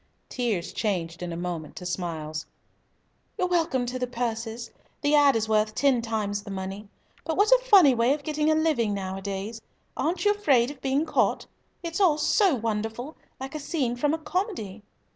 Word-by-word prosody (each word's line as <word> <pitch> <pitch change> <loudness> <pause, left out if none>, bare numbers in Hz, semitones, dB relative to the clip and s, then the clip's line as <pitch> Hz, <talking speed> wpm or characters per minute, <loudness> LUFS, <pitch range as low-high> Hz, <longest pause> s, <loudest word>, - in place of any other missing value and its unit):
Tears 220 -8 -2
changed 175 -6 -2
in 175 -1 -4
a 165 - -4
moment 170 -3 -5
to 180 - -8
smiles. 160 -4 -4 0.9
"You're 365 - +1
welcome 325 -8 +1
to 250 +1 -4
the 250 - -1
purses. 230 -1 -4 0.3
The 290 0 +2
'ad.' 285 -3 +6
is 220 -1 0
worth 215 0 +1
ten 270 -4 +3
times 215 -3 -2
the 205 - -11
money. 195 +1 -6 0.3
But 320 - -2
what 415 +3 +4
a - - +7
funny 390 - +7
way 240 +3 +3
of 295 - -11
getting 305 +1 0
a 310 - +4
living 295 -10 +1
nowadays! 195 +3 -4 0.3
Aren't 340 +5 -1
you 410 - +6
afraid 280 -12 +3
of 275 -3 -13
being 275 +3 +1
caught? - - +1 0.4
It's 335 +3 -3
all 335 -6 +5
so 365 +2 +3
wonderful, 225 +5 -3 0.2
like 265 +2 -6
a 305 - -4
scene 275 -5 -1
from 290 +5 +1
a - - -4
comedy." 315 - -3
245 Hz, 180 wpm, -26 LUFS, 205-305 Hz, 0.9 s, a